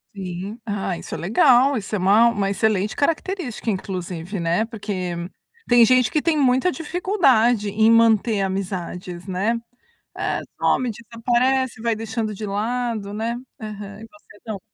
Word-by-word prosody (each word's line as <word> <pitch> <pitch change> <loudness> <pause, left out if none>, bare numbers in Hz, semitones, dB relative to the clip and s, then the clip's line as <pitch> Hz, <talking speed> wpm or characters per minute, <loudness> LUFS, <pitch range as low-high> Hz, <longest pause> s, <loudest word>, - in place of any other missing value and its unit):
Sim, 190 +3 -6
ah, 200 -4 -2
isso - - -9
é - - -3
legal, 250 - +4
isso 210 0 -6
é - - +1
uma 205 +5 +5
uma 200 -4 -1
excelente 205 0 0
característica, 325 - -2
inclusive, 185 -2 -4
né, 170 +6 +1
porque 200 -6 -4 0.5
tem 240 -1 +7
gente 250 -1 +4
que 305 - +1
tem 325 -2 +1
muita 265 +5 +3
dificuldade 270 - +2
em 220 +2 +3
manter 225 -2 +4
amizades, 185 -2 -4
né, 200 +5 0 0.6
eh, - - -1 0.2
some, 250 -2 +1
desaparece, 240 +3 0
vai 230 -1 0
deixando 225 0 -3
de 215 - -5
lado, 215 0 -2
né, 225 +3 -2 0.2
aham 210 -1 -8
e 225 - -10
você 205 0 -20
não. 215 -4 -5
220 Hz, 145 wpm, -22 LUFS, 195-240 Hz, 0.6 s, tem